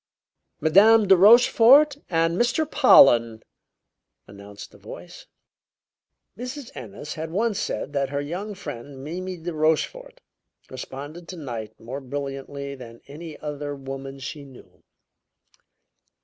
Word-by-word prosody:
"Madame 205 +7 +5
De 190 - +7
Rochefort 240 +8 +6
and 165 0 +1
Mr. 240 - +1
Pollen!" 120 - +5 0.8
announced 100 0 -12
a - - -17
voice. - - -12 1.1
Mrs. 250 +2 -8
Ennis 120 +5 -8
had 160 0 -6
once 210 +4 -1
said 145 - -4
that 140 -1 -1
her 140 0 -3
young 180 +9 -5
friend, 140 -6 -9
Mimi 180 +4 -6
de 170 +1 -6
Rochefort, - - -1 0.5
responded 145 +6 -9
to 185 - -8
night 115 -8 -7
more 130 +5 -7
brilliantly 140 +1 -6
than 125 -4 -11
almost 115 - -22
any 160 +1 -9
other 145 -1 -5
woman 135 0 -8
she 140 +2 -8
knew. 135 -3 -17
150 Hz, 120 wpm, -24 LUFS, 135-195 Hz, 1.1 s, De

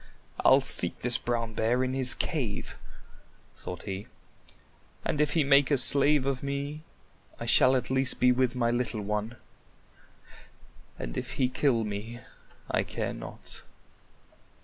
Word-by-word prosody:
"I'll - - +6
seek - - +2
this - - +3
Brown 115 -2 -2
Bear 120 +4 +1
in 130 0 -2
his 130 -1 +2
cave," 130 - -3 0.8
thought 90 -1 -8
he, 100 +1 -6 1.0
"and 150 - 0
if 150 -1 +1
he 160 - +3
make 140 0 +4
a 145 - +3
slave 140 +2 +3
of 135 -2 -1
me, 140 +2 -4 0.6
I - - -5
shall 130 +1 +5
at 125 0 -2
least 130 0 +1
be 125 0 +5
with 125 0 +1
my 120 -2 +1
little 120 -2 -1
one, 105 +3 -3 1.6
and - - -6
if 125 +2 -7
he 130 -2 +1
kill 125 -3 +1
me, 105 +3 -6 0.5
I - - +2
care - - -4
not." - - -9
125 Hz, 145 wpm, -28 LUFS, 115-140 Hz, 1.6 s, I'll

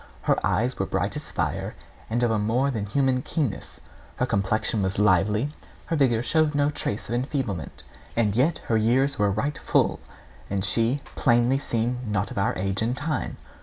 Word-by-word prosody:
Her - - +1
eyes - - +1
were - - 0
bright - - -1
as - - -6
fire, - - -2 0.3
and 120 +2 0
of 120 - +3
a 110 - +1
more 120 +7 +1
than 105 -5 -3
human 130 +3 +1
keenness; 140 - -3 0.4
her - - +1
complexion 100 +2 0
was 95 0 -1
lively, 105 +6 +3 0.3
her 165 - -1
vigour 125 -6 +2
showed 155 +1 +2
no 145 0 +2
trace 105 -7 -3
of - - -4
enfeeblement; 120 - -3 0.3
and 105 -3 +2
yet 145 +8 +2
her 115 - +2
years 130 +5 +2
were 105 0 +3
right 140 +9 -1
full, - - +2 0.5
and 95 0 -1
she 115 +7 +2
plainly 120 +1 +3
seemed 120 -1 -2
not 105 +1 -1
of 120 - -3
our 100 - +1
age 95 +2 -1
and 120 +3 0
time. 150 -1 -2
120 Hz, 180 wpm, -25 LUFS, 105-135 Hz, 0.5 s, of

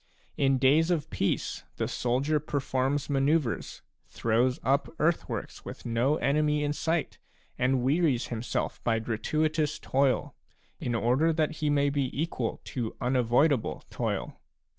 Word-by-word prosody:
In 135 -1 +3
days 145 +6 +4
of 160 -3 -1
peace 100 - -1
the - - -1
soldier 135 +5 0
performs 140 -1 -1
manoeuvres, 140 -2 0 0.2
throws 120 +3 +1
up 140 +2 +1
earthworks 165 +2 -1
with - - -9
no 120 +5 +2
enemy 150 0 +1
in 145 0 0
sight, 165 +1 -1 0.4
and 125 0 +2
wearies 140 -2 +2
himself 120 0 -3
by 115 -1 +2
gratuitous 150 +7 0
toil, 135 -3 +1 0.5
in 120 - -2
order 125 +8 +2
that 155 -1 0
he 150 -1 0
may 145 -1 +2
be 140 -2 0
equal 140 -8 -2
to 120 -4 -4
unavoidable 125 +2 +2
toil. - - -3
140 Hz, 130 wpm, -28 LUFS, 125-150 Hz, 0.5 s, days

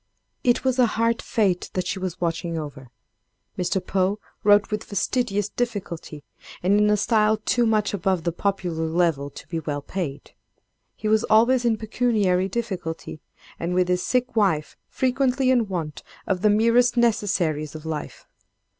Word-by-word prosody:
It 245 -1 +2
was 260 -1 +1
a 245 - +6
hard 230 0 +1
fate 195 -5 0
that 185 -1 -1
she 190 +1 -3
was 185 -2 -4
watching 170 0 -2
over. 145 -4 -7 0.7
Mr. 180 +1 0
Poe 190 +1 +1 0.3
wrote 205 0 +4
with 210 +1 -2
fastidious 205 0 -1
difficulty, 185 -11 -4 0.4
and 200 +3 +4
in 210 0 +4
a 210 - +3
style 215 0 +3
too 235 +2 +1
much 215 -2 +1
above 190 -3 0
the 170 - 0
popular 175 -3 -2
level 160 -4 +1
to - - -12
be 165 -2 -3
well 145 -2 -4
paid. 155 -7 -5 0.6
He 215 - -4
was 215 +1 +3
always 240 +3 +4
in 225 -2 +2
pecuniary 210 -5 +1
difficulty, 180 -8 -4 0.4
and, 175 +2 -2
with 180 0 +2
his 180 0 +1
sick 250 +3 0
wife, 175 -9 +1
frequently 260 0 +1
in 240 -4 +2
want 165 -6 -4 0.2
of 185 -2 -1
the 210 - +4
merest 230 +4 +3
necessaries 180 -10 +1
of 155 0 -8
life. 155 -2 -5
195 Hz, 160 wpm, -24 LUFS, 170-225 Hz, 0.7 s, a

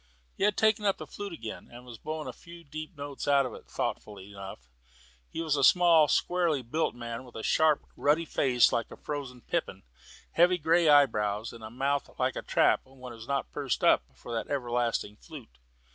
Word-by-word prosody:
He - - -3
had 210 0 +2
taken 215 -1 +3
up 200 -2 +2
the - - -7
flute 205 -1 -7
again, 115 -9 -8
and 120 +1 -12
was 120 -3 -11
blowing 155 0 -5
a - - -5
few 170 0 -13
deep 155 +2 -8
notes 145 -1 -6
out 140 -1 +4
of 125 - -5
it, - - -12
thoughtfully 100 -1 -5
enough. 95 -11 -9 0.6
He 165 - -4
was 155 -3 +1
a 140 - 0
small, 170 -1 +6
squarely 170 -4 +1
built 140 +4 -1
man, 120 +1 -6
with 125 - -15
a 110 - -6
sharp 155 -2 +3
ruddy 155 +3 +2
face 125 -5 +3
like 115 -2 -1
a - - -11
frozen 140 -5 -6
pippin, - - -3 0.5
heavy 175 +2 +4
grey 165 0 +3
eyebrows, 110 -7 +3
and 115 -1 -11
a 110 - -7
mouth 135 +4 -1
like - - 0
a - - -3
trap - - +3
when 130 -2 -11
it - - -10
was 115 +1 -11
not 140 0 -2
pursed 140 -3 -2
up - - +5
for 120 - -9
that 115 - -2
everlasting 120 -5 -1
flute. - - -13
140 Hz, 205 wpm, -29 LUFS, 115-160 Hz, 0.6 s, small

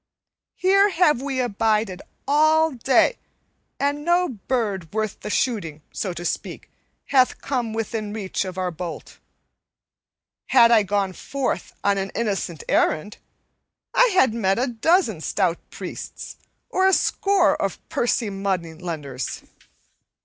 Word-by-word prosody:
"Here 395 +2 +4
have 320 -8 +3
we 270 -1 -2
abided 215 -4 0 0.3
all 310 +2 +4
day, 260 - +2 0.6
and 285 +1 0
no 350 +2 +2
bird 210 - -2
worth 215 -1 -2
the - - -6
shooting, 180 - -1
so 190 - -3
to 175 0 -7
speak, - - -4 0.4
hath 260 -2 +3
come 245 -5 -2
within 220 -1 -3
reach 205 -3 -2
of 185 -1 -7
our 185 -1 -1
bolt. 170 0 -7 1.3
Had 235 -3 +6
I 225 -2 +6
gone 200 -1 -1
forth 265 -3 -3
on 200 -1 +2
an 195 0 -3
innocent 195 -7 -2
errand, 155 +7 +1 0.8
I - - +5
had 260 -10 +4
met 195 -4 +1
a 250 - +1
dozen 245 - +1
stout 175 -1 0
priests - - -8 0.3
or 375 0 +3
a 385 - +4
score 395 0 +3
of 195 - -1
pursy 235 -3 0
money 190 -4 -2
lenders. 155 -7 -5
220 Hz, 130 wpm, -23 LUFS, 190-275 Hz, 1.3 s, Had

